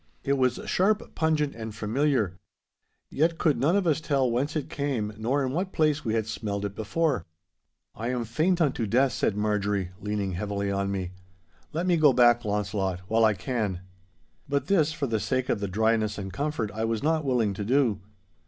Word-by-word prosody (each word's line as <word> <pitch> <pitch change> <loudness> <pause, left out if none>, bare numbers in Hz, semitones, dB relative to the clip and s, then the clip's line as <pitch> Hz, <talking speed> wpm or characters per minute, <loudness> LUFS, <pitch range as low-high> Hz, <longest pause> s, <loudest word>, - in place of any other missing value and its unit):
It 140 - +1
was 130 -2 +1
sharp, 215 +5 +1
pungent, 155 -3 +1
and 110 -2 -7
familiar. 115 -2 +1 0.8
Yet 165 +3 +1
could 155 -5 +2
none 155 +7 +3
of 200 -2 +2
us 160 -2 +2
tell 135 -5 +1
whence 140 +6 -1
it 150 -3 -2
came, 130 -7 -2
nor 130 +6 0
in 130 - -2
what 185 +6 -2
place 150 -2 +2
we 110 -2 -1
had 110 -2 0
smelled 105 -2 -3
it 100 - -4
before. 125 - -1 0.7
'I 115 - -5
am 125 -2 -1
faint 160 +11 +1
unto 130 -7 +1
death,' 125 +4 +3
said 105 - 0
Marjorie, 105 -3 0
leaning 105 -1 -2
heavily 100 +2 -2
on 100 0 -1
me. 95 -2 -3 0.6
'Let 165 +3 -2
me 180 -2 +3
go 150 -4 +5
back, 120 -1 +5
Launcelot, 100 -3 -1
while 115 +1 +3
I 110 -1 +4
can.' 100 -3 -2 0.7
But 140 -1 0
this, 160 -5 +3
for 155 -3 -2
the 115 -4 0
sake 130 +3 -1
of - - +1
the 100 - -2
dryness 110 +2 +1
and 95 -2 -6
comfort, 125 -3 -2
I 110 +2 -3
was 115 +1 -1
not 160 0 +2
willing 120 -7 +1
to 105 - -4
do. 125 -1 +2
115 Hz, 190 wpm, -27 LUFS, 105-145 Hz, 0.8 s, go